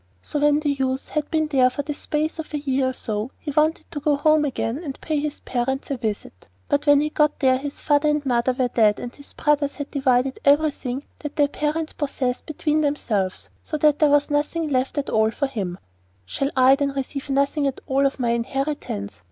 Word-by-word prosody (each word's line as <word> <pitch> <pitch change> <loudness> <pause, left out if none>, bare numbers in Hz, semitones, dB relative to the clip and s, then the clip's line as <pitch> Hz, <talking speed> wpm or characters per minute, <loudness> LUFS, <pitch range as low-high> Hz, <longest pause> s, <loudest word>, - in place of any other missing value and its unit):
So 295 - -3
when 295 +1 +3
the 295 -2 +1
youth 265 -1 -2
had 300 -1 -2
been 315 -1 +1
there 265 -4 +3
for 285 +3 -4
the 295 - -3
space 310 +2 -2
of 310 -1 -5
a - - -1
year 270 -2 0
or - - -4
so, 215 -1 -3
he 295 - -5
wanted 310 +3 +1
to 305 - -4
go 290 0 +2
home 305 +1 +3
again 265 0 -2
to - - -14
pay 310 -2 -1
his 300 0 -4
parents 265 +3 -2
a 275 - -1
visit; 210 - -5 0.2
but 285 +1 0
when 290 0 +6
he 300 0 -1
got 300 -1 +2
there 260 -1 +3
his 285 +1 -6
father 295 0 +3
and 295 -1 0
mother 245 -1 +2
were 255 0 +1
dead, 215 -3 +3
and 245 0 -6
his 285 - -12
brothers 290 -1 +1
had 285 -1 -6
divided 265 -1 +1
everything 285 -3 +2 0.2
that 295 -1 -6
their 290 -2 +4
parents 305 +2 -2
possessed 265 -4 -2
between 310 0 0
themselves, 215 -10 -1
so 305 - -4
that 300 -1 +3
there 300 - +5
was 290 +1 +3
nothing 295 0 0
at 270 +2 -1
all 220 0 +3
left 220 - -2
for 285 - +1
him. 200 -10 -4 0.5
'Shall 275 - -2
I, 260 +1 +7
then, 280 -1 -1
receive 275 +1 -4
nothing 280 +1 +1
at 270 - -3
all 275 +1 +2
of 270 - -5
my 240 -2 +1
inheritance? 235 - -3
280 Hz, 215 wpm, -23 LUFS, 260-295 Hz, 0.5 s, I